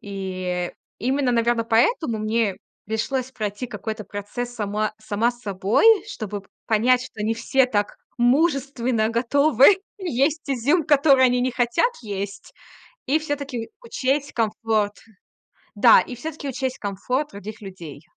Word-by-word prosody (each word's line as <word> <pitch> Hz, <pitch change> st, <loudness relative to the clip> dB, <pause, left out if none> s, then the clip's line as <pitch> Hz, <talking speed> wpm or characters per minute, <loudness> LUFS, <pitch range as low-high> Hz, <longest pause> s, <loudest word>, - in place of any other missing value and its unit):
И, 185 Hz, -3 st, -4 dB
э, -, -, -22 dB, 0.3 s
именно, 260 Hz, +2 st, +1 dB
наверно, 230 Hz, 0 st, +1 dB
поэтому 230 Hz, -, +2 dB
мне 215 Hz, -2 st, 0 dB, 0.3 s
пришлось 250 Hz, +4 st, -2 dB
пройти 210 Hz, +1 st, -4 dB
какой-то 220 Hz, -3 st, -6 dB
процесс 240 Hz, +4 st, -6 dB
сама 215 Hz, -1 st, -2 dB
сама 215 Hz, +2 st, 0 dB
с 240 Hz, 0 st, -16 dB
собой, 200 Hz, -, +1 dB, 0.2 s
чтобы 210 Hz, -, -6 dB, 0.2 s
понять, 240 Hz, +3 st, +3 dB
что 235 Hz, -4 st, -8 dB
не 225 Hz, +2 st, 0 dB
все 265 Hz, +3 st, +2 dB
так, 205 Hz, -4 st, -1 dB, 0.2 s
мужественно 255 Hz, -4 st, +2 dB
готовы 280 Hz, -, +4 dB, 0.2 s
есть 300 Hz, -3 st, 0 dB
изюм, 280 Hz, +6 st, +2 dB
который 280 Hz, -3 st, +5 dB
они 250 Hz, -1 st, +3 dB
не 255 Hz, -, +1 dB
хотят 245 Hz, -, +1 dB
есть. 200 Hz, -2 st, -6 dB, 0.5 s
И 285 Hz, +4 st, +2 dB
всё-таки 280 Hz, -6 st, -4 dB
учесть 285 Hz, -, -1 dB
комфорт. 220 Hz, -2 st, 0 dB, 0.8 s
Да, 225 Hz, +2 st, +7 dB
и 255 Hz, -, -6 dB
всё-таки 290 Hz, +3 st, -6 dB
учесть 260 Hz, 0 st, -3 dB
комфорт 250 Hz, +9 st, -2 dB
других 205 Hz, +2 st, -8 dB
людей. 170 Hz, -8 st, -10 dB
235 Hz, 130 wpm, -23 LUFS, 210-270 Hz, 0.8 s, Да